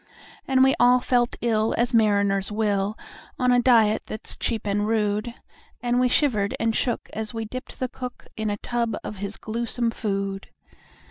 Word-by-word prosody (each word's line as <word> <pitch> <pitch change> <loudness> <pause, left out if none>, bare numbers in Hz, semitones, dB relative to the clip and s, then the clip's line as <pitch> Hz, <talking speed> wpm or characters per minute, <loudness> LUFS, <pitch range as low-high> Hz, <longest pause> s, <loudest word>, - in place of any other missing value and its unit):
And 260 -1 +4
we 265 - +5
all 245 +1 +6
felt 245 -1 +1
ill 225 -2 +1
as 240 +1 +1
mariners 200 -3 +2
will, 210 -1 0 0.4
On 250 0 +2
a 245 0 +4
diet 225 -4 +4
that's 215 - -4
cheap 225 -3 -2
and 205 +1 0
rude; 215 +1 0 0.4
And 245 0 +1
we 250 - +4
shivered 220 -8 +1
and 225 -1 +1
shook 240 - -1
as 220 +1 -3
we 225 -1 -3
dipped 255 +4 -8
the 255 - 0
cook 250 0 -8
In 220 -1 -2
a 205 - -2
tub 235 +1 -2
of 210 - -6
his 200 +1 -5
gluesome 235 +1 -2
food. 195 -3 -3
225 Hz, 175 wpm, -24 LUFS, 210-245 Hz, 0.4 s, all